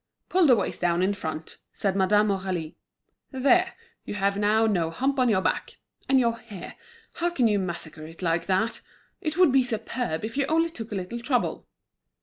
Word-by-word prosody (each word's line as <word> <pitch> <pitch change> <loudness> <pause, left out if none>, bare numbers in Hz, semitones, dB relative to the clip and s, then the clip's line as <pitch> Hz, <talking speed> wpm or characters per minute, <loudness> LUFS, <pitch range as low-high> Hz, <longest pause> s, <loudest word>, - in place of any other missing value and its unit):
"Pull 365 -3 +4
the 250 - +7
waist 200 - -3
down 175 0 +2
in 195 +2 +2
front," 160 -5 -6
said 195 -2 -1
Madame 205 +2 +3
Aurélie. 185 -5 -2 0.6
"There, 350 +8 +3 0.3
you - - -6
have 200 0 +1
now 210 +2 +3
no 175 -7 +1
hump 265 +10 -1
on 250 -1 +4
your 190 -4 +2
back. - - -1 0.3
And 270 -1 +5
your 235 -2 +1
hair, 215 -6 -9 0.4
how 345 +1 0
can 265 -9 +2
you 210 -2 +2
massacre 165 -4 -5
it 165 +3 -11
like 165 0 0
that? 195 +4 0 0.4
It 310 +1 -2
would 360 -6 +6
be 270 0 +5
superb, 230 -5 -2
if 225 +4 -6
you 280 -1 +1
only 330 +1 +2
took 225 -8 -7
a - - -3
little 190 +5 -4
trouble." 245 0 -1
215 Hz, 190 wpm, -26 LUFS, 185-260 Hz, 0.6 s, the